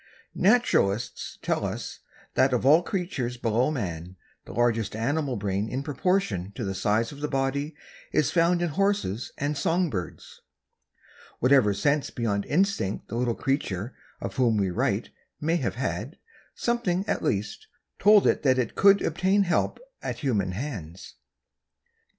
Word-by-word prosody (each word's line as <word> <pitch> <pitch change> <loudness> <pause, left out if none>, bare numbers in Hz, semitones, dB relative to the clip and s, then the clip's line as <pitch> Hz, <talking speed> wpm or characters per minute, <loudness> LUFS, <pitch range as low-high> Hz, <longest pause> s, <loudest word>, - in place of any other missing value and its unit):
Naturalists 185 - +1
tell - - 0
us - - -4 0.3
that 130 0 +3
of 125 - 0
all 155 +5 +7
creatures 170 - -3
below 120 +3 +1
man, 90 - -4 0.3
the - - -10
largest 115 -1 0
animal 135 +4 -1
brain 100 0 -2
in 130 +2 -3
proportion 140 - 0
to - - -4
the 95 -1 -2
size 105 +4 0
of 145 - -10
the 150 - 0
body 140 +2 -1 0.4
is 150 -1 +2
found 175 +1 +3
in 175 - 0
horses 195 - 0
and 145 +2 -1
song 165 +3 +1
birds. 90 -5 -6 1.0
Whatever 130 -4 +4
sense 140 +8 +1
beyond 105 -5 -1
instinct 180 - 0
the 115 - -4
little 120 -1 0
creature 120 -5 -2 0.2
of - - -6
whom 120 -4 +3
we 95 -2 +1
write 90 - 0 0.3
may 165 +3 +1
have - - -2
had, - - -3 0.4
something, 205 -5 0
at - - 0
least, 435 - -2 0.3
told 210 0 +6
it - - +3
that 130 -3 +3
it 125 -3 -1
could 200 0 +5
obtain 190 +5 +2
help 175 -2 0 0.2
at - - -4
human 105 -9 0
hands. 95 - -6
135 Hz, 150 wpm, -26 LUFS, 105-170 Hz, 1.0 s, all